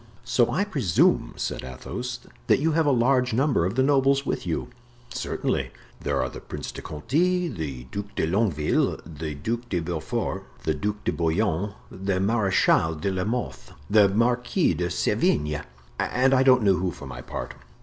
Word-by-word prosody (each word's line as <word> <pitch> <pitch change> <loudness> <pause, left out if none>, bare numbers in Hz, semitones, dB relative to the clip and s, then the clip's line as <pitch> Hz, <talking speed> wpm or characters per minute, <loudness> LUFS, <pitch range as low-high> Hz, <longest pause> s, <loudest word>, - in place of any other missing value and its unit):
"So 120 0 +2
I 195 - +1
presume," 125 - +2
said - - -3
Athos, 65 0 -6 0.3
"that - - +5
you 160 +3 +2
have 160 0 +2
a - - +5
large 125 0 +3
number 130 - +2
of 95 - -4
the 130 - +3
nobles 140 0 +3
with 125 - -2
you?" - - -2 0.4
"Certainly. - - -2 0.3
There - - -1
are - - -1
the - - -8
Prince - - -6
de - - -8
Conti, 175 - 0
the 75 - -5
Duc 100 0 -6
de - - +1
Longueville, 85 -4 +1
the 75 -1 -6
Duc 115 +11 -3
de 90 - 0
Beaufort, 80 -1 -3 0.2
the 80 - +1
Duc 105 +4 -3
de - - +1
Bouillon, 95 +3 0 0.2
the 95 0 -1
Marechal 95 -6 +3
de 90 +6 -2
la 95 -1 -1
Mothe, 120 +3 -4 0.2
the 105 -2 +6
Marquis 125 - +2
de 85 +2 -1
Sevigne, 75 -2 +1 0.4
and 130 +2 +2
I 130 - +5
don't 130 -3 +5
know 95 -3 +4
who, 90 0 0
for 75 - -9
my 60 -2 -7
part." - - -6
105 Hz, 175 wpm, -25 LUFS, 80-125 Hz, 0.4 s, the